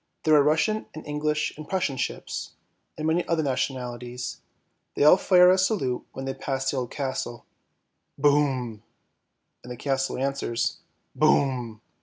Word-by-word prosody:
There 155 - +3
are 150 - +7
Russian 160 +9 +1
and 155 - -8
English 150 +1 -1
and 155 0 -10
Prussian 180 -8 0
ships, 125 - -4 0.4
and 155 - -4
many 165 +2 +2
other 165 -2 +1
nationalities; 125 -2 -3 0.5
they - - +2
all 150 - +9
fire 180 -1 +6
a 190 - +3
salute 175 - 0
when 135 - -6
they 135 - -2
pass 135 0 -2
the 140 - -3
old 125 -2 -2
castle; 130 -4 -4 0.4
" - - -51
boom," 135 -6 +1 0.8
and 125 - -9
the 125 - -6
castle 135 0 -1
answers, 135 -3 -1 0.2
" - - -47
boom." 130 -6 +2
140 Hz, 155 wpm, -26 LUFS, 125-155 Hz, 0.8 s, all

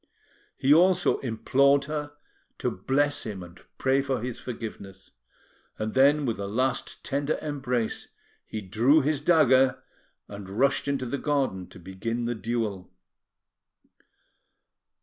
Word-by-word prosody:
He 135 +2 +4
also 180 +3 +4
implored 140 +3 +2
her 150 0 -4 0.4
to - - -1
bless 145 +9 0
him 100 -4 -6
and 85 +1 -14 0.2
pray 135 +1 +2
for 135 -2 -2
his 120 +1 -5
forgiveness; 100 -5 -8 0.7
and 110 0 -3
then, 140 +3 +4
with 115 -5 -2
a 100 - -3
last 130 +6 -2
tender 140 +2 -1
embrace, 125 -6 -2 0.4
he 110 - -5
drew 115 +11 +3
his 145 0 0
dagger, 135 -5 +4 0.4
and 100 -2 -9
rushed 135 +8 +1
into 140 -2 -1
the 130 +3 -3
garden 135 -11 -1
to - - -14
begin 105 +7 -4
the 120 - -1
duel. 110 -3 -3
130 Hz, 130 wpm, -27 LUFS, 110-140 Hz, 0.7 s, He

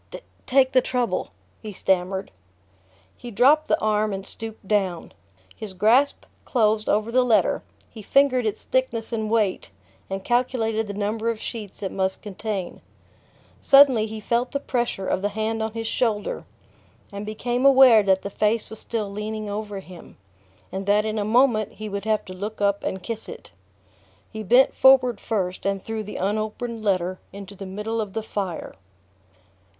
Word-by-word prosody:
"take 260 -1 +4
the 255 - +4
trouble," 250 -1 -1 0.3
he 215 - -7
stammered. 190 0 -1 0.8
He 245 - -9
dropped 280 +8 +4
the - - +2
arm 215 -1 +1
and 195 0 -5
stooped 220 -2 -7
down. 190 -5 -1 0.4
His 205 -3 -8
grasp 240 +9 +3 0.2
closed 215 -3 +1
over 215 +2 +1
the 255 +2 +4
letter, 235 -3 +2 0.3
he 220 - -11
fingered 255 +1 +3
its 210 - -4
thickness 235 -3 -1
and 220 -1 -2
weight 215 -4 0 0.4
and 195 0 -4
calculated 225 -2 0
the 200 - -6
number 215 +3 -1
of 230 -2 -2
sheets 210 -5 -7
it 190 - -2
must 190 0 -2
contain. 205 -2 -5 0.8
Suddenly 270 -6 +6
he 220 0 -6
felt 235 +5 -1
the 280 - 0
pressure 240 -7 -2
of 185 - -1
the 205 - 0
hand 220 +2 -2
on 220 0 -3
his 225 0 -4
shoulder, 220 -2 -1 0.7
and 200 0 -6
became 240 +4 -2
aware 265 -5 +7
that 190 -1 +2
the 200 - -5
face 215 +3 0
was 220 - -8
still 220 -3 -3
leaning 210 +1 -5
over 205 -1 -5
him, 180 -2 -14 0.5
and 190 +1 -5
that 210 +1 +3
in 215 0 -2
a - - 0
moment 220 -1 +2
he 215 +1 -7
would 200 0 -5
have 215 -1 0
to 185 - -8
look 205 +4 -6
up 200 0 +1
and 190 -1 -4
kiss 225 +2 -6
it... - - -10 0.8
He 220 - -6
bent 245 +6 +4
forward 260 -3 +5
first 185 -4 -2
and 195 0 0
threw 220 -1 -3
the 210 0 -8
unopened 215 +3 -3
letter 185 -2 0
into 200 0 -10
the 195 0 -8
middle 210 +4 -3
of 200 -3 -6
the 225 - -3
fire. 195 -6 -4
215 Hz, 170 wpm, -24 LUFS, 200-230 Hz, 0.8 s, aware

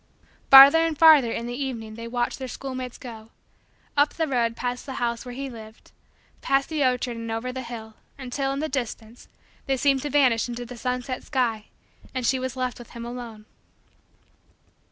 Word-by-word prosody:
Farther 275 +4 +10
and 325 -2 0
farther 300 -7 +7
in 230 - -3
the 240 - -5
evening 245 -5 -5
they 230 +1 -8
watched 240 +2 -2
their 260 - -5
schoolmates 255 -1 -6
go 225 -3 -10 0.7
up 290 +1 +2
the 325 - 0
road 235 -4 0
past 245 +2 -4
the 265 - -5
house 235 -2 -2
where 245 -1 -8
he 275 +1 -4
lived 220 -3 -12 0.5
past 275 0 +1
the 310 -3 0
orchard 250 -2 0
and 230 0 -6
over 225 +3 -3
the 260 +1 -5
hill 230 -2 -8 0.2
until, 270 +1 -3
in 275 +1 -3
the 310 - -1
distance, 240 -4 -5 0.4
they 270 -1 +1
seemed 275 +1 +2
to 295 - -4
vanish 250 -5 +3
into 240 0 -5
the 250 +1 -9
sunset 250 +1 -3
sky 235 -6 -1 0.5
and 255 -2 -2
she 260 +2 +2
was 260 0 -4
left 255 -1 -3
with 240 - -12
him 235 -1 -8
alone. 235 -3 -8
250 Hz, 185 wpm, -25 LUFS, 235-270 Hz, 0.7 s, Farther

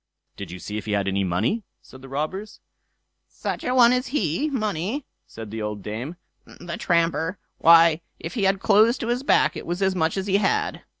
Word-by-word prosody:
"Did - - -8
you 90 - -7
see 105 +4 -5
if - - -10
he 105 - -1
had 100 -1 0
any 100 0 0
money?" 105 - 0 0.2
said 130 - -15
the 135 - -11
robbers. 155 +10 -4 0.7
"Such - - -5
a 250 - 0
one 245 -1 +7
as 250 +1 0
he 250 - 0
money!" 215 - -2 0.2
said 110 -2 -9
the 110 0 -5
old 105 -2 -4
dame, 120 - -5 0.3
"the 175 -1 -8
tramper! 165 +1 +1 0.2
Why, 165 0 +6 0.2
if - - -6
he 215 -6 0
had 195 0 +2
clothes 220 +5 +4
to 230 - -4
his 245 +1 0
back, 275 - +3
it - - -7
was 175 +2 -2
as 190 0 +2
much 160 +1 0
as 190 - -2
he 200 -1 +2
had." 200 -1 0
170 Hz, 205 wpm, -24 LUFS, -, 0.7 s, one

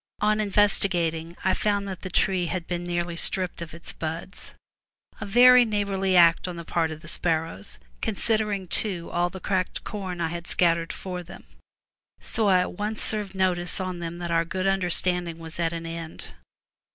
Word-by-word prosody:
On 215 +1 +2
investi 205 -1 +4
gating 165 -1 -2
I 190 - +3
found 205 0 0
that 190 -2 -6
the 185 - -5
tree 185 -1 +2
had 175 0 -3
been 175 0 -3
nearly 175 -1 -2
stripped 180 0 -1
of 170 - -6
its 170 - -10
buds 165 +3 -6 0.3
— - - -28
a 205 - -4
very 250 +4 +8
neighborly 200 -4 +1
act 170 0 +6
on 180 - -5
the 170 -1 -7
part 165 -1 0
of 155 -1 -7
the - - -12
sparrows, 160 - -1 0.2
considering, 210 -2 0
too, 180 -3 -1
all 175 +1 +1
the 190 - -8
cracked 185 0 -1
corn 190 -5 -5
I 165 -1 0
had 170 +1 -6
scattered 170 -1 +2
for 180 -1 -5
them. 175 +2 -12 0.8
So 220 -2 -1
I 185 -2 +5
at 180 - -3
once 215 +1 -2
served 210 -3 -2
notice 180 -1 +1
on 185 -2 -3
them 170 0 -5
that 175 -1 -4
our 165 0 +3
good 185 +3 -3
understanding 180 -2 0
was 165 0 -9
at 165 -1 +1
an 165 -1 -5
end. 165 -1 -7
180 Hz, 190 wpm, -26 LUFS, 170-195 Hz, 0.8 s, very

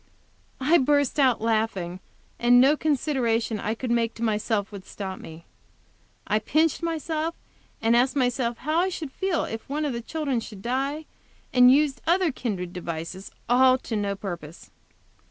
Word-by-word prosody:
I 310 +6 +4
burst 285 +1 +2
out 260 -5 +3
laughing, 215 -6 -1 0.4
and 245 +1 +6
no 275 +4 +6
consideration 250 -7 0
I 215 +3 -2
could 245 +1 -4
make 235 -1 +1
to 230 - -6
myself 215 -1 0
would 200 -2 -8
stop 190 -1 -6
me. 160 +1 -11 0.8
I 215 - +1
pinched 310 +10 +1
myself, 325 0 -2 0.5
asked 240 +4 +3
myself 245 -3 0
how 310 +4 0
I 370 +2 +2
should 315 -6 -6
feel 380 -1 -1
if 225 +3 -6
one 300 +2 -1
of 285 - -1
the 235 - -4
children 280 -1 -2
should 210 -4 -10
die, 275 +5 -2 0.5
and 250 0 +7
used 285 0 +2
other 350 -1 +3
kindred 190 -9 -4
devices 170 +2 -6 0.2
all 255 +1 +5
to 235 - -5
no 200 -1 -1
purpose. 170 -5 -8
245 Hz, 155 wpm, -25 LUFS, 215-290 Hz, 0.8 s, and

